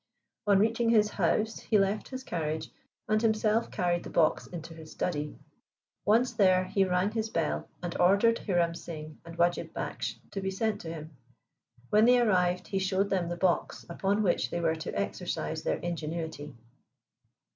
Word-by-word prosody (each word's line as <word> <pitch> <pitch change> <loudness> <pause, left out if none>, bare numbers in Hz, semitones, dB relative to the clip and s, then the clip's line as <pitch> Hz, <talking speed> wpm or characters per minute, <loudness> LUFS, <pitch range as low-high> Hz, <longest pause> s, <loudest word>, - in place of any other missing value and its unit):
On 200 -1 +6
reaching 230 +3 +2
his 215 -2 +4
house 210 +4 0
he 215 - +1
left 200 +1 +1
his 260 0 -6
carriage, 160 -5 -3 0.4
and 215 0 +2
himself 220 0 +2
carried 175 -1 0
the - - -7
box 160 -2 +2
into 170 -1 -8
his 160 -1 -11
study. 150 -4 -3 0.7
Once 230 +4 +3
there 185 -2 +4
he 195 +1 +1
rang 180 +2 +1
his 220 0 -2
bell 165 -7 -1
and 175 -1 -3
ordered 200 +6 +4
Hiram 175 -4 +1
Singh 155 -2 -8
and 170 0 -11
Wajib 175 0 +1
Baksh - - -4 0.2
to 195 - -4
be 190 - -1
sent 210 +2 -1
to 165 - -7
him. 155 -1 -8 0.8
When 215 +1 +6
they 245 +1 +6
arrived 180 -6 +2
he 195 - 0
showed 190 +1 0
them 180 -3 0
the 175 - -3
box 180 -1 0
upon 200 +4 0
which 180 - +1
they 170 - -2
were 165 -1 +2
to 160 - -4
exercise - - -3
their - - 0
ingenuity. 160 -3 -5
185 Hz, 170 wpm, -29 LUFS, 170-210 Hz, 0.8 s, On